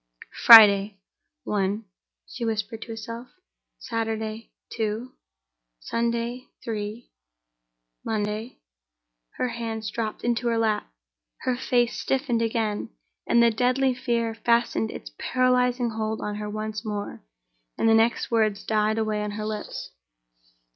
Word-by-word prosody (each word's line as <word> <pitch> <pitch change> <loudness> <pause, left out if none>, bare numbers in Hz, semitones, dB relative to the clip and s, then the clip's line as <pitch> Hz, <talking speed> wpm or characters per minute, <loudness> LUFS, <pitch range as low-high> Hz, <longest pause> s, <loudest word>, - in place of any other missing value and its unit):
"Friday, 205 -3 +9 0.5
one," 205 +1 -1 0.4
she 275 -6 -7
whispered 220 0 -2
to - - -8
herself; 230 +2 -7 0.5
"Saturday, 220 -1 -4 0.2
two; 225 +3 -3 0.7
Sunday, 235 - -2 0.2
three; 215 +1 -5 0.9
Monday—" 215 +2 -3 0.8
Her 250 - 0
hands 225 -2 -4
dropped 220 -2 -4
into 240 0 0
her 230 -1 +1
lap, 220 - 0 0.5
her 255 -1 0
face 245 -1 +1
stiffened 255 -3 0
again; 225 -2 -1 0.4
the 235 0 +5
deadly 255 +3 +2
fear 235 -3 -1
fastened 235 - +1
its - - -8
paralyzing 250 -1 +2
hold 220 0 -3
on 210 0 -4
her 210 0 -4
once 215 0 -4
more, 210 -2 -5 0.6
and - - +2
the 225 - +6
next 225 +2 +2
words 215 -3 +1
died 215 0 +1
away 215 -1 0
on 210 - -2
her 210 +1 -5
lips. 215 - -5
225 Hz, 120 wpm, -25 LUFS, 215-235 Hz, 0.9 s, Friday